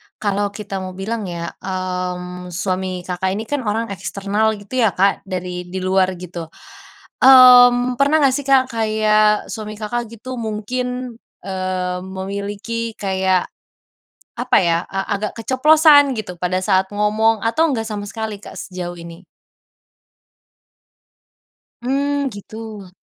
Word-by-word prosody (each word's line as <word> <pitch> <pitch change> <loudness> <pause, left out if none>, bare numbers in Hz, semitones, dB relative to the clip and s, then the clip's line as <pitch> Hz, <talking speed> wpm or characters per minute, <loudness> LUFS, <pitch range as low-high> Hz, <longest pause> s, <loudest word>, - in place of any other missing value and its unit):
kalau 205 -1 -1
kita 200 -1 -6
mau 185 - -6
bilang 215 +3 -3
ya, 170 -1 -5
mmm, 180 -1 -4
suami 185 +1 -2 0.2
Kakak 185 +1 -2
ini 220 - -3
kan 290 -2 -1
orang 225 +2 0
eksternal 205 +3 -1
gitu 245 +6 -3
ya 220 - +5
Kak 195 +2 +2
dari 180 -1 -5
di 190 - -4
luar 185 0 +2
gitu, 170 -2 -8 0.7
mmm, 250 -1 +8
pernah 280 +2 +3
nggak 275 -3 +4
sih 285 - -3
Kak 270 -1 +5
kayak 215 -1 +2
suami 215 -1 -6
Kakak 240 +3 -2
gitu 255 +3 -7
mungkin, 250 +3 -4 0.3
eee, 185 -1 -2
memiliki 200 +4 -4
kayak, 190 -2 +1 0.9
apa 250 +1 +2
ya? 170 -2 +2
A 195 +1 -2
agak 210 +1 -3
keceplosan 285 +4 +5
gitu 180 -5 -6
pada 185 +1 -1
saat 190 -1 +2
ngomong 215 +1 +2
atau 280 +7 +1
nggak 225 -2 -2
sama 205 -1 -4
sekali 220 0 -5
Kak - - -11
sejauh 180 -1 -6
ini? 170 +2 -11 2.6
Mmm, 280 +2 0
gitu. 210 -2 -9
210 Hz, 130 wpm, -19 LUFS, 185-230 Hz, 2.6 s, mmm